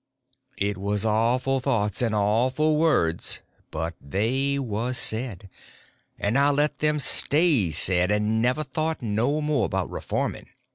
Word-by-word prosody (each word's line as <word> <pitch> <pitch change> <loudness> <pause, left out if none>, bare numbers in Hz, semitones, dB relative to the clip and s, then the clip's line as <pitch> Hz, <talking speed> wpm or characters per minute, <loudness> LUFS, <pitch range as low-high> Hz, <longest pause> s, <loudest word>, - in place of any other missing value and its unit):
It 100 -1 -2
was 100 +1 -1
awful 120 +5 +1
thoughts 115 -6 -1
and 115 -3 0
awful 125 +9 +1
words, 150 - +1 0.3
but 80 +2 -4
they 130 - -1
was 125 -1 -2
said. 110 -5 +1 0.7
And 110 +7 0
I 140 +1 +4
let 145 +1 0
them 150 0 +1
stay 145 - +2
said; 90 +4 +2
and 105 +2 +1
never 125 +6 +1
thought 155 -1 -2
no 120 +8 0
more 150 -7 0
about - - -3
reforming. - - -4
120 Hz, 135 wpm, -25 LUFS, 105-140 Hz, 0.7 s, I